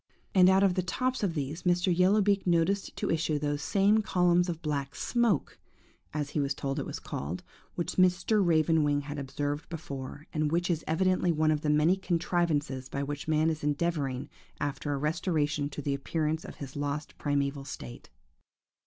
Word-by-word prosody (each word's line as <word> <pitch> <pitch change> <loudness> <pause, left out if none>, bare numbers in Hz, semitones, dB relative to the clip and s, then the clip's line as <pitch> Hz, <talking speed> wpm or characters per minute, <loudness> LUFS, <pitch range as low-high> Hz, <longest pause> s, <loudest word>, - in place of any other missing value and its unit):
And 185 -1 +7
out 190 +1 +5
of 195 -2 +4
the 185 - +1
tops 255 +8 -1
of 185 -5 0
these 150 +3 -3
Mr. 180 0 +2
Yellow 190 +4 +4
beak 200 -1 +1
noticed 175 +4 +1
to - - -1
issue 160 -2 +1
those 145 0 -1
same 200 +6 +3
columns 180 -3 +2
of 165 -1 -4
black 140 -3 -2
smoke, 235 - 0 0.5
as 150 -1 -3
he - - -1
was 140 -1 0
told 135 0 -2
it - - -4
was - - -5
called, 80 +6 -5 0.3
which 170 -1 -3
Mr. 185 +3 +3
Raven 160 -2 +3
wing 145 -1 +2
had 145 +1 -6
observed 145 +2 -3
before, 145 -3 -7
and 155 -1 0
which 175 +2 +1
is 165 -2 -1
evidently 180 +2 +2
one 155 -1 +2
of 150 -1 0
the 150 - -1
many 150 +4 +4
contrivances 165 -7 -1
by 140 - -2
which 145 +1 -5
man 155 +1 +3
is 155 -1 -5
endeavouring 145 -3 -1 0.3
after 145 +1 -2
a 140 - 0
restoration 150 -1 0
to 145 0 -7
the 140 - 0
appearance 155 +3 -1
of - - -9
his 135 -2 -8
lost 145 +1 -3
primeval 140 -1 0
state. 65 - -9
155 Hz, 185 wpm, -29 LUFS, 145-180 Hz, 0.5 s, And